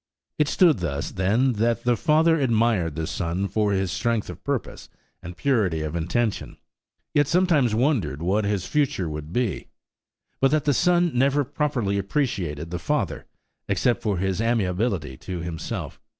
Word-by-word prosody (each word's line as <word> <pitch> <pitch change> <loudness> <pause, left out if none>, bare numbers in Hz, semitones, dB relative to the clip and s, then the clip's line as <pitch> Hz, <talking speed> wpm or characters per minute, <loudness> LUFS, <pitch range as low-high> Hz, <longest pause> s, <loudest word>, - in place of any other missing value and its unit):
It 150 - +3
stood 160 - +4
thus, 75 -5 -3
then, 110 +8 +2
that 115 0 +1
the 120 0 +3
father 160 +5 +3
admired 115 - +1
the 80 -1 -2
son 90 +3 -2
for 105 0 0
his 95 -2 0
strength 115 0 -1
of - - -13
purpose - - -4 0.3
and 85 0 -9
purity 105 - +1
of 75 +1 -4
intention, 100 +7 -1 0.6
yet 145 -2 +3
sometimes 160 - +3
wondered 110 - +1
what 100 +5 +1
his 100 -2 -1
future 130 - 0
would 75 0 -6
be; 120 0 -1 0.7
but 135 - +4
that 150 0 +1
the 145 - +3
son 175 +4 +3
never 140 +3 +2
properly 125 -8 -1
appreciated 95 - -2
the 90 - -3
father, 95 - -2 0.4
except 120 -1 +1
for 105 -5 -1
his 95 +2 -1
amiability 95 - 0
to 90 -2 -6
himself. 85 -1 -5
110 Hz, 155 wpm, -24 LUFS, 90-135 Hz, 0.7 s, stood